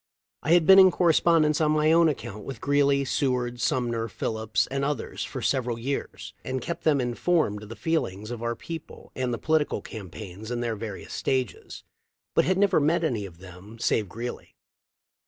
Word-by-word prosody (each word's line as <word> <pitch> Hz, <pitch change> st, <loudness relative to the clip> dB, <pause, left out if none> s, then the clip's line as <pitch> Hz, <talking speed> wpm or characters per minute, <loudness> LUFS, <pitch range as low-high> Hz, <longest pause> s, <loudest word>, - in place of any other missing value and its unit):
I 160 Hz, -, +2 dB
had 175 Hz, -2 st, +5 dB
been 190 Hz, +2 st, +9 dB
in 190 Hz, -1 st, +9 dB
correspondence 165 Hz, -3 st, +3 dB
on 155 Hz, -1 st, +3 dB
my 155 Hz, +1 st, +3 dB
own 165 Hz, 0 st, +5 dB
account 110 Hz, -7 st, -5 dB
with 130 Hz, -1 st, -7 dB
Greeley, 140 Hz, -1 st, +2 dB
Seward, 125 Hz, -3 st, -1 dB
Sumner, 120 Hz, -2 st, 0 dB
Phillips, 110 Hz, 0 st, -1 dB
and 135 Hz, 0 st, -1 dB
others 140 Hz, -3 st, -3 dB
for -, -, -6 dB
several 125 Hz, -3 st, 0 dB
years, 135 Hz, +4 st, -4 dB
had 130 Hz, 0 st, -2 dB
kept 170 Hz, -, -5 dB
them 150 Hz, -3 st, +4 dB
informed 120 Hz, -2 st, 0 dB
of 105 Hz, -, -11 dB
the 115 Hz, -, -7 dB
feelings 110 Hz, -, -2 dB
of 120 Hz, -2 st, -5 dB
our 120 Hz, 0 st, -1 dB
people 165 Hz, +6 st, -9 dB
and 130 Hz, -1 st, -1 dB
the 120 Hz, -, -1 dB
political 155 Hz, +1 st, +1 dB
campaigns 100 Hz, 0 st, -9 dB
in 120 Hz, -1 st, -2 dB
their 115 Hz, -2 st, -1 dB
various 105 Hz, -2 st, -7 dB
stages, 130 Hz, -2 st, -2 dB, 0.5 s
but -, -, +3 dB
had 185 Hz, 0 st, +2 dB
never 200 Hz, -4 st, +4 dB
met 160 Hz, +3 st, +2 dB
any 115 Hz, -10 st, -1 dB
of 85 Hz, -3 st, -15 dB
them 95 Hz, +4 st, -12 dB
save 110 Hz, -3 st, 0 dB
Greeley. 120 Hz, +4 st, -7 dB
125 Hz, 180 wpm, -26 LUFS, 110-155 Hz, 0.5 s, been